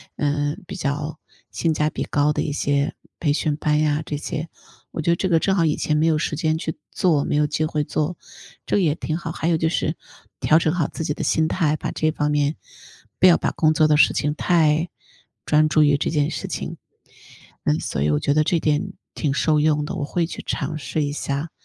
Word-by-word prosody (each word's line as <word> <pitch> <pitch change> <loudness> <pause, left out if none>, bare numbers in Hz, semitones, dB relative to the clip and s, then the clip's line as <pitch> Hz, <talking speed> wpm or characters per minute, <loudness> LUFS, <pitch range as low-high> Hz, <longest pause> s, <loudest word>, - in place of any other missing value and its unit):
呃， 145 0 0
比 - - -7
较 150 0 -3 0.3
性 165 -2 0
价 150 0 +1
比 - - -4
高 145 0 +2
的 150 - -1
一 145 - -2
些 140 0 0 0.2
培 145 -3 +1
训 150 0 0
班 150 -1 +1
呀 150 0 +1
这 145 - -3
些。 150 +2 -4 0.4
我 - - -3
觉 170 - +2
得 - - +4
这 190 +2 -1
个 165 -2 +4
正 195 +3 +1
好 170 -4 +3
以 150 - +2
前 150 - 0
没 155 +2 +3
有 160 -2 +3
时 150 0 -1
间 155 0 0
去 160 -1 -4 0.2
做、 160 -6 +2
没 - - -1
有 150 0 +3
机 150 +1 -1
会 155 -1 0
做， 155 +3 -2 0.5
这 - - +1
也 160 -6 +2
挺 155 - -3
好。 165 - -5
还 160 - -3
有 170 - +3
就 160 0 +1
是 160 -1 -1 0.4
调 155 - +4
整 160 -1 +1
好 170 -5 0
自 - - -6
己 150 - -1
的 - - -5
心 160 0 +2
态， 155 -3 +1
把 - - -4
这 155 - 0
方 150 -1 -1
面 145 +1 +1 0.6
不 185 - +7
要 175 - +7
把 - - -1
工 155 -1 +2
作 155 0 +4
的 150 -1 +4
事 - - +5
情 150 0 0
太 160 0 +2 0.6
专 155 0 +3
注 155 0 +4
于 145 -1 +4
这 140 - -1
件 150 -2 +1
事 - - -4
情。 - - -5 0.9
嗯， 75 - +2
所 - - -3
以 75 - +2
我 75 -1 +2
觉 140 - +1
得 155 +1 +3
这 165 +2 +1
点 155 +5 0 0.2
挺 150 - -1
受 155 +1 +2
用 150 -1 +2
的， 150 - -5
我 165 - -3
会 170 +3 0
去 165 - -7
尝 150 +2 -3
试 155 +1 -2
一 145 - -2
下。 145 +2 -3
155 Hz, 250 characters per minute, -22 LUFS, 150-160 Hz, 0.9 s, 不